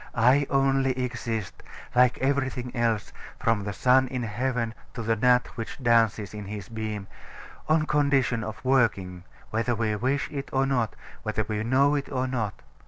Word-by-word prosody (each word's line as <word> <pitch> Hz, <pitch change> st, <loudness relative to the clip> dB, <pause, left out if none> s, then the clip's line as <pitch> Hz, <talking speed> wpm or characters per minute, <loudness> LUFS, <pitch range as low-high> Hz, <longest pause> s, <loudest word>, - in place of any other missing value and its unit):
I 130 Hz, +4 st, +4 dB
only 135 Hz, -1 st, +2 dB
exist 120 Hz, -5 st, -3 dB, 0.3 s
(like 125 Hz, 0 st, +4 dB
everything 130 Hz, -2 st, -1 dB
else, 115 Hz, -3 st, 0 dB, 0.3 s
from 115 Hz, -3 st, +1 dB
the 100 Hz, -, -2 dB
sun 130 Hz, +5 st, +4 dB
in 125 Hz, -1 st, -3 dB
heaven 115 Hz, +1 st, -1 dB, 0.2 s
to 115 Hz, -, -4 dB
the 115 Hz, +1 st, +1 dB
gnat 125 Hz, +2 st, +4 dB
which 115 Hz, -, -5 dB
dances 115 Hz, -4 st, +3 dB
in 105 Hz, -1 st, -6 dB
his 100 Hz, -1 st, -7 dB
beam) 110 Hz, -3 st, -4 dB, 0.6 s
on 155 Hz, 0 st, +3 dB
condition 140 Hz, -6 st, +2 dB
of 110 Hz, +4 st, -7 dB
working, 100 Hz, -9 st, +1 dB, 0.3 s
whether 115 Hz, +2 st, 0 dB
we 110 Hz, -1 st, 0 dB
wish 130 Hz, +6 st, 0 dB
it 140 Hz, -2 st, -5 dB
or 135 Hz, 0 st, +2 dB
not, 125 Hz, -6 st, 0 dB, 0.3 s
whether 110 Hz, 0 st, -1 dB
we 110 Hz, 0 st, -2 dB
know 135 Hz, +5 st, +3 dB
it 140 Hz, -1 st, -2 dB
or 130 Hz, -1 st, 0 dB
not. 115 Hz, -6 st, -3 dB
120 Hz, 165 wpm, -26 LUFS, 110-130 Hz, 0.6 s, I